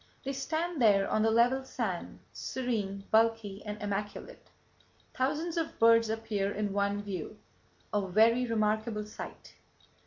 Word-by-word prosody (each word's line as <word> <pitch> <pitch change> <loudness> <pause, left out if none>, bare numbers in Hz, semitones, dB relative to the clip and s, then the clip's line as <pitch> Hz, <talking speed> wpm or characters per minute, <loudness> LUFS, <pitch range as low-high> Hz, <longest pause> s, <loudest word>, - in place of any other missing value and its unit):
They 275 - -3
stand 315 +3 -2
there 200 -3 +5
on 215 - +1
the 225 - +4
level 240 +4 +3
sand, 220 -9 -4
serene, 210 -6 -3
bulky 220 -3 +2
and 210 0 -6
immaculate. 205 0 -5 0.6
Thousands 305 +6 -1
of 325 -1 -2
birds 230 0 +5
appear 220 -3 -1
in 205 -1 -2
one 200 0 0
view—a 200 +1 -6
very 230 +6 +4
remarkable 215 -1 0
sight. 210 - -9
220 Hz, 125 wpm, -30 LUFS, 205-245 Hz, 0.6 s, there